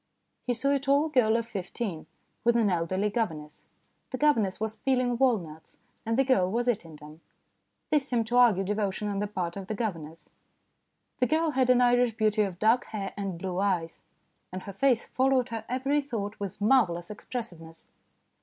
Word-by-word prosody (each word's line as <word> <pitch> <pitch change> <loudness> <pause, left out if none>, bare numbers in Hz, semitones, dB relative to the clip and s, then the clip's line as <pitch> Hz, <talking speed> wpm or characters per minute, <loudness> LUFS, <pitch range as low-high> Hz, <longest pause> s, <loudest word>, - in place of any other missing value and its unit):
He 245 - +1
saw 275 +4 0
a 280 - +2
tall 280 +3 +2
girl 230 -6 +3
of 230 - -2
fifteen 195 -5 -5 0.4
with 235 0 +3
an 220 -4 +3
elderly 185 +4 0
governess. 160 -10 -4 0.4
The 255 - -4
governess 230 -11 +2
was 220 0 -3
peeling 255 0 0
walnuts, 180 -12 -1 0.3
and 225 +1 0
the 270 - +4
girl 220 -9 +2
was 240 +4 -1
eating 185 -10 -1
them; 150 +2 -13 0.7
this 290 -3 +2
seemed 235 -4 0
to 245 - +1
argue 225 -6 +5
devotion 210 0 -2
on 200 -1 -2
the 205 - -1
part 180 -4 -4
of 195 -1 -7
the 215 - -3
governess. 165 -8 -5 0.9
The 250 - +3
girl 315 +4 +1
had 260 -2 +1
an 250 0 +5
Irish 245 -2 +3
beauty 215 -1 +2
of 195 -4 -2
dark 225 +5 +3
hair 200 -3 -5
and 195 -3 -4
blue 180 +1 -4
eyes, 180 -5 -1 0.5
and 185 0 -6
her 200 - -8
face 245 +3 +2
followed 260 -1 +1
her 225 -1 -5
every 270 +4 +1
thought 220 -7 -5
with 200 -3 -5
marvellous 205 -7 +2
expressiveness. 175 -8 -8
220 Hz, 180 wpm, -28 LUFS, 190-250 Hz, 0.9 s, argue